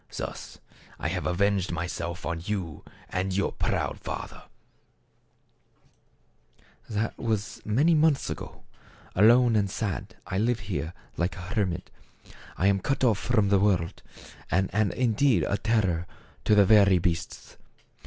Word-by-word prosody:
Thus -, -, -6 dB, 0.4 s
have 90 Hz, +4 st, -2 dB
I -, -, +1 dB
avenged 95 Hz, 0 st, +1 dB
myself 85 Hz, 0 st, -4 dB
on 85 Hz, 0 st, -3 dB
you 90 Hz, -6 st, -4 dB, 0.3 s
and 95 Hz, +1 st, -1 dB
your 100 Hz, -, +1 dB
proud -, -, -2 dB
father/ -, -, -7 dB, 1.6 s
" -, -, -34 dB
That 110 Hz, +1 st, -2 dB
was 110 Hz, -1 st, -2 dB
many 140 Hz, +11 st, +3 dB
months 155 Hz, -2 st, +3 dB
ago. -, -, -7 dB, 0.5 s
Alone 115 Hz, +4 st, +5 dB
and 100 Hz, -2 st, +2 dB
sad 95 Hz, -, -4 dB
I 95 Hz, -, -2 dB
live 115 Hz, 0 st, +1 dB
here 90 Hz, -4 st, -4 dB, 0.2 s
like 85 Hz, +2 st, -1 dB
a -, -, -7 dB
hermit. 90 Hz, -5 st, -1 dB, 0.7 s
I 90 Hz, -, 0 dB
am 100 Hz, 0 st, +4 dB
cut 135 Hz, +7 st, -1 dB
off 110 Hz, -6 st, +3 dB
from 110 Hz, -5 st, +1 dB
the 100 Hz, -1 st, +4 dB
world, 95 Hz, -5 st, +1 dB, 0.5 s
and 95 Hz, +2 st, +1 dB
am 105 Hz, -1 st, +2 dB
indeed 120 Hz, -, +2 dB
a 100 Hz, -, -1 dB
terror 95 Hz, -7 st, +1 dB, 0.4 s
to 105 Hz, -, +5 dB
the 100 Hz, -1 st, +6 dB
very 100 Hz, -2 st, +6 dB
beasts 85 Hz, -1 st, -3 dB
100 Hz, 140 wpm, -27 LUFS, 90-110 Hz, 1.6 s, the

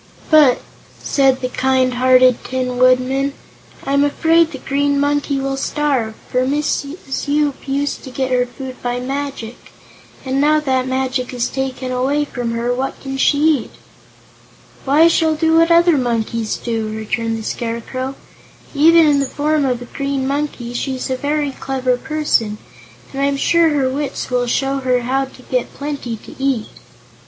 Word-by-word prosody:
"But," 295 Hz, -5 st, +6 dB, 0.4 s
said 270 Hz, -2 st, +2 dB
the 255 Hz, -, -1 dB
kind 260 Hz, 0 st, +1 dB
hearted 255 Hz, 0 st, +4 dB
Tin 255 Hz, -1 st, -3 dB
Woodman, 255 Hz, +2 st, +3 dB, 0.5 s
"I'm 280 Hz, +1 st, +2 dB
afraid 325 Hz, +3 st, +3 dB
the 275 Hz, -, -6 dB
Green 280 Hz, +1 st, 0 dB
Monkey 285 Hz, -1 st, 0 dB
will 270 Hz, 0 st, -2 dB
starve, 270 Hz, -6 st, -1 dB
for 250 Hz, -, 0 dB
Mrs. 285 Hz, +1 st, -2 dB
Yoop 290 Hz, -1 st, 0 dB
used 280 Hz, +1 st, -2 dB
to -, -, -8 dB
get 260 Hz, 0 st, -2 dB
her 250 Hz, -1 st, +2 dB
food 260 Hz, +1 st, -9 dB
by 245 Hz, 0 st, -2 dB
magic, 270 Hz, -3 st, -5 dB, 0.5 s
and 265 Hz, +1 st, 0 dB
now 305 Hz, +1 st, +4 dB
that 265 Hz, -4 st, +1 dB
the -, -, -6 dB
magic 260 Hz, -1 st, -2 dB
is 240 Hz, -1 st, -1 dB
taken 265 Hz, -1 st, -3 dB
away 270 Hz, +4 st, 0 dB
from 245 Hz, -4 st, -4 dB
her, 235 Hz, +1 st, -1 dB
what 265 Hz, +2 st, -3 dB
can 270 Hz, -1 st, -6 dB
she 285 Hz, +2 st, +3 dB
eat?" 305 Hz, -6 st, +2 dB, 1.1 s
"Why, 295 Hz, +5 st, +5 dB
she'll 320 Hz, -2 st, +2 dB
eat 320 Hz, 0 st, +2 dB
what 330 Hz, +1 st, +4 dB
other 335 Hz, -2 st, +5 dB
monkeys 230 Hz, -2 st, -1 dB
do," 225 Hz, -2 st, -3 dB
returned 225 Hz, +1 st, -2 dB
the 220 Hz, -, -6 dB
Scarecrow. 245 Hz, +4 st, -4 dB, 0.6 s
"Even 325 Hz, +3 st, +6 dB
in 290 Hz, -2 st, +3 dB
the 275 Hz, -, 0 dB
form 295 Hz, +1 st, 0 dB
of 250 Hz, -2 st, -1 dB
a -, -, -9 dB
Green 275 Hz, +1 st, -3 dB
Monkey, 275 Hz, -4 st, -3 dB
she's 260 Hz, +1 st, -3 dB
a -, -, +1 dB
very 290 Hz, +2 st, -1 dB
clever 260 Hz, -1 st, -1 dB
person, 245 Hz, -7 st, -1 dB, 0.6 s
and 270 Hz, -, -3 dB
I'm 280 Hz, 0 st, +1 dB
sure 335 Hz, +3 st, +3 dB
her 285 Hz, -3 st, +1 dB
wits 275 Hz, 0 st, -3 dB
will 245 Hz, -1 st, +1 dB
show 270 Hz, +3 st, 0 dB
her 255 Hz, -2 st, +1 dB
how 265 Hz, +3 st, 0 dB
to 260 Hz, -1 st, -16 dB
get 250 Hz, -1 st, -2 dB
plenty 280 Hz, -5 st, -4 dB
to -, -, -11 dB
eat." 260 Hz, -6 st, 0 dB
270 Hz, 165 wpm, -18 LUFS, 250-285 Hz, 1.1 s, But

